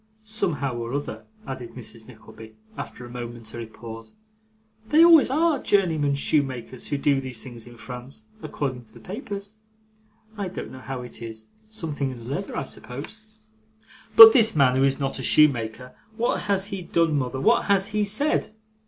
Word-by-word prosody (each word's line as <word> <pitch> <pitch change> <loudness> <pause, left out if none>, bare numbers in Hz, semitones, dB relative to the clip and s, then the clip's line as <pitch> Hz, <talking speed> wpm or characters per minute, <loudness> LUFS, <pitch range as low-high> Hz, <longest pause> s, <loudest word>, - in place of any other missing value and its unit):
Somehow 170 - -2
or 120 +2 -4
other,' 145 - -5 0.2
added 125 -3 -7
Mrs. 115 -2 -10
Nickleby, 110 -2 -14 0.2
after 125 - -8
a - - -11
momentary 120 -1 -7
pause, 115 0 -11 0.8
'they 310 +2 +6
always 330 -6 +7
ARE 310 +1 +2
journeyman 160 -8 +2
shoemakers 130 -4 -2
who 145 - -1
do 140 -1 +2
these 130 -4 -4
things 120 -3 -10
in 120 -1 -13
France, 125 - -9 0.2
according 130 -4 -4
to 110 - -24
the - - -12
papers. 200 0 -7 0.8
I 200 - -2
don't 185 - -7
know 130 - -10
how 130 -1 -6
it 120 - -9
is 110 -1 -8 0.2
something 155 -10 -3
in 120 -3 -9
the 125 +4 -5
leather, - - -5
I - - -1
suppose.' 215 - -8 0.8
'But 225 0 +12
this 225 -6 +4
man, 135 -4 +4
who 135 - +3
is 135 0 +2
not 135 -1 -2
a - - -3
shoemaker 125 -4 +2 0.2
what 240 +1 0
has 195 -1 +2
he 195 - -3
done, 165 -2 +1
mother, 130 -1 -2
what 135 - +3
has 200 0 +2
he 210 0 0
said? 215 +2 0
135 Hz, 170 wpm, -24 LUFS, 120-200 Hz, 0.8 s, But